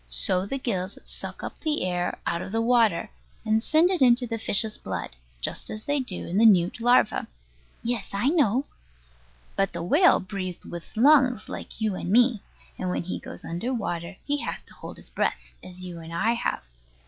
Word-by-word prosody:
So 60 Hz, -, +2 dB
the 270 Hz, -, -2 dB
gills 195 Hz, -7 st, -3 dB
suck -, -, -3 dB
up -, -, -6 dB
the 305 Hz, -, -1 dB
air 180 Hz, -1 st, -1 dB
out 170 Hz, 0 st, -1 dB
of -, -, -6 dB
the 225 Hz, -, 0 dB
water, 230 Hz, -, +2 dB, 0.3 s
and 220 Hz, 0 st, +2 dB
send 315 Hz, +8 st, +3 dB
it 365 Hz, -, 0 dB
into 245 Hz, -1 st, +5 dB
the 230 Hz, -1 st, -4 dB
fish's 215 Hz, 0 st, +2 dB
blood, -, -, -5 dB, 0.3 s
just -, -, -3 dB
as 215 Hz, 0 st, -6 dB
they 290 Hz, 0 st, +1 dB
do 230 Hz, -9 st, -3 dB
in 185 Hz, +4 st, 0 dB
the 230 Hz, -, +6 dB
newt 185 Hz, +1 st, +3 dB
larva. 245 Hz, -2 st, +3 dB, 0.6 s
Yes, 235 Hz, -3 st, -2 dB
I 200 Hz, +7 st, +1 dB
know. 275 Hz, -, +3 dB, 0.9 s
But 195 Hz, -1 st, 0 dB
the -, -, -3 dB
whale 310 Hz, -, +5 dB
breathes 185 Hz, -2 st, -6 dB
with 170 Hz, +5 st, -9 dB
lungs 255 Hz, -3 st, +4 dB
like -, -, -7 dB
you 215 Hz, -2 st, 0 dB
and 180 Hz, -, -4 dB
me; 235 Hz, 0 st, +4 dB, 0.4 s
and 185 Hz, -, -2 dB
when 180 Hz, -, -1 dB
he 180 Hz, -, -4 dB
goes -, -, -9 dB
under 175 Hz, +10 st, -3 dB
water 175 Hz, -4 st, -4 dB
he 290 Hz, 0 st, 0 dB
has -, -, -4 dB
to -, -, -15 dB
hold -, -, -10 dB
his -, -, -7 dB
breath, -, -, -2 dB
as 185 Hz, 0 st, -8 dB
you 180 Hz, -2 st, -7 dB
and 165 Hz, 0 st, -10 dB
I 210 Hz, +8 st, +1 dB
have. 235 Hz, -, -2 dB
215 Hz, 195 wpm, -26 LUFS, 180-245 Hz, 0.9 s, the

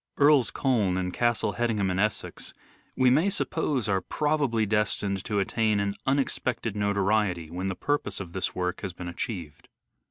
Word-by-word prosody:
Earl's 145 Hz, -3 st, +5 dB
Colne 110 Hz, -9 st, +1 dB
and 90 Hz, -1 st, -2 dB
Castle 120 Hz, -2 st, +1 dB
Hedingham 110 Hz, -5 st, 0 dB
in 90 Hz, -, -1 dB
Essex 105 Hz, +1 st, -2 dB, 0.4 s
we 130 Hz, -1 st, +5 dB
may 155 Hz, +9 st, +4 dB
suppose 150 Hz, -, -1 dB
are 95 Hz, -2 st, +1 dB
probably 140 Hz, -2 st, 0 dB
destined 100 Hz, -2 st, 0 dB
to 105 Hz, -, -1 dB
attain 105 Hz, +1 st, +1 dB
an 100 Hz, 0 st, -1 dB
unexpected 130 Hz, -5 st, 0 dB
notoriety 100 Hz, -4 st, +1 dB
when 90 Hz, +2 st, -3 dB
the 95 Hz, -, -2 dB
purpose 145 Hz, -8 st, -1 dB
of 90 Hz, -4 st, -7 dB
this 95 Hz, -, -2 dB
work 90 Hz, 0 st, -2 dB
has 95 Hz, -3 st, -4 dB
been 90 Hz, 0 st, -7 dB
achieved. 85 Hz, -, -6 dB
105 Hz, 160 wpm, -27 LUFS, 95-125 Hz, 0.4 s, Earl's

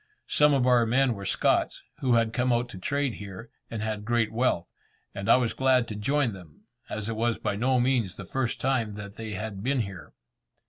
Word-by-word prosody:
Some 150 Hz, -1 st, +4 dB
of 130 Hz, -2 st, +2 dB
our 120 Hz, -2 st, +4 dB
men 130 Hz, +2 st, +3 dB
were 100 Hz, -3 st, -6 dB
Scots, -, -, +1 dB, 0.2 s
who 125 Hz, -3 st, +2 dB
had 115 Hz, -1 st, +2 dB
come 125 Hz, 0 st, +1 dB
out 120 Hz, 0 st, +1 dB
to 95 Hz, -, -9 dB
trade 140 Hz, +5 st, -1 dB
here, 100 Hz, +3 st, -9 dB, 0.2 s
and 110 Hz, -2 st, -4 dB
had 110 Hz, -1 st, -3 dB
great 115 Hz, -1 st, +1 dB
wealth, 115 Hz, -7 st, +1 dB, 0.5 s
and 100 Hz, 0 st, -4 dB
I -, -, +8 dB
was 125 Hz, -3 st, +1 dB
glad 130 Hz, -2 st, +3 dB
to 105 Hz, -, -4 dB
join 130 Hz, +3 st, +1 dB
them, 90 Hz, -1 st, -14 dB, 0.3 s
as 105 Hz, -1 st, -4 dB
it 115 Hz, -, -2 dB
was 115 Hz, +1 st, 0 dB
by -, -, -2 dB
no 125 Hz, +4 st, +2 dB
means 120 Hz, -6 st, +1 dB
the 100 Hz, -, -8 dB
first 125 Hz, +4 st, -2 dB
time 120 Hz, -6 st, 0 dB
that 100 Hz, 0 st, -8 dB
they 110 Hz, -2 st, -5 dB
had 100 Hz, 0 st, -5 dB
been 130 Hz, +3 st, +1 dB
here. 100 Hz, -4 st, -7 dB
115 Hz, 215 wpm, -27 LUFS, 105-125 Hz, 0.5 s, I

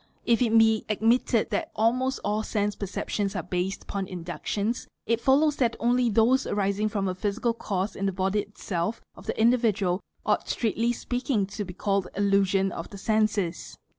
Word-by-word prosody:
If 235 Hz, +1 st, +3 dB
it 230 Hz, -2 st, +4 dB
be 220 Hz, -1 st, +4 dB
admitted 225 Hz, +1 st, +2 dB
that 205 Hz, -, -1 dB
almost 255 Hz, +4 st, +1 dB
all 210 Hz, +1 st, +1 dB
sense 210 Hz, -2 st, -1 dB
Bception: 200 Hz, +1 st, -2 dB
are -, -, -2 dB
based 180 Hz, +2 st, -2 dB
upon 195 Hz, -2 st, -4 dB
inductions, 185 Hz, +6 st, -3 dB, 0.2 s
it 230 Hz, 0 st, +1 dB
follows 295 Hz, +2 st, +3 dB
that 235 Hz, -3 st, +1 dB
only 245 Hz, 0 st, +2 dB
those 230 Hz, +5 st, +3 dB
arising 205 Hz, +1 st, 0 dB
$FA,.. -, -, -18 dB
ay: -, -, -15 dB
rom 195 Hz, -1 st, 0 dB
a -, -, -1 dB
physical 210 Hz, +5 st, -1 dB
cause 200 Hz, -3 st, -3 dB
in 195 Hz, -, -1 dB
the -, -, +1 dB
body 190 Hz, +2 st, 0 dB
itself 205 Hz, -1 st, -3 dB, 0.2 s
of -, -, -14 dB
the -, -, -3 dB
individual 220 Hz, -6 st, +2 dB, 0.2 s
ought -, -, +1 dB
strictly 230 Hz, +1 st, 0 dB
je 240 Hz, -, -7 dB
peaking 245 Hz, -4 st, 0 dB
to 210 Hz, -, -3 dB
be 180 Hz, -1 st, -9 dB
called 195 Hz, -1 st, 0 dB
"illusions 195 Hz, -1 st, +2 dB
of 165 Hz, -, -6 dB
the 200 Hz, -, -9 dB
senses." 210 Hz, -4 st, 0 dB
210 Hz, 185 wpm, -27 LUFS, 195-230 Hz, 0.2 s, it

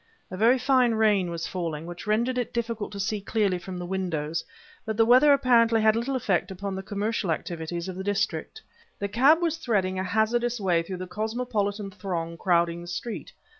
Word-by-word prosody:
A -, -, -4 dB
very 235 Hz, +6 st, +5 dB
fine 255 Hz, -2 st, +3 dB
rain 210 Hz, -5 st, +3 dB
was 170 Hz, -1 st, -4 dB
falling, 165 Hz, -4 st, -4 dB
which 175 Hz, +4 st, -8 dB
rendered 235 Hz, +4 st, +1 dB
it 245 Hz, -, -3 dB
difficult 230 Hz, -2 st, -2 dB
to 200 Hz, -, -6 dB
see 210 Hz, +1 st, -1 dB
clearly 200 Hz, -3 st, 0 dB
from 185 Hz, +1 st, -7 dB
the 175 Hz, -, -5 dB
windows; 170 Hz, -4 st, -2 dB, 0.4 s
but 220 Hz, -1 st, -4 dB
the 225 Hz, -, +5 dB
weather 255 Hz, +5 st, +6 dB
apparently 235 Hz, -4 st, +4 dB
had 220 Hz, 0 st, +4 dB
little 245 Hz, +4 st, -1 dB
effect 200 Hz, -8 st, 0 dB
upon 195 Hz, +1 st, -5 dB
the 190 Hz, -, -4 dB
commercial 205 Hz, 0 st, -2 dB
activities 170 Hz, +1 st, -3 dB
of 185 Hz, -, -5 dB
the 190 Hz, -, -5 dB
district. 205 Hz, -, -2 dB, 0.3 s
The 200 Hz, -, -2 dB
cab 275 Hz, -, +4 dB
was 330 Hz, -1 st, 0 dB
threading 195 Hz, -, 0 dB
a -, -, -1 dB
hazardous 230 Hz, +5 st, +1 dB
way 180 Hz, -4 st, +2 dB
through 185 Hz, +2 st, -6 dB
the 185 Hz, -, -5 dB
cosmopolitan 215 Hz, -1 st, -2 dB
throng 175 Hz, -4 st, -4 dB
crowding 170 Hz, -1 st, +1 dB
the 175 Hz, -, -10 dB
street. 215 Hz, +6 st, -5 dB
205 Hz, 195 wpm, -26 LUFS, 180-230 Hz, 0.4 s, weather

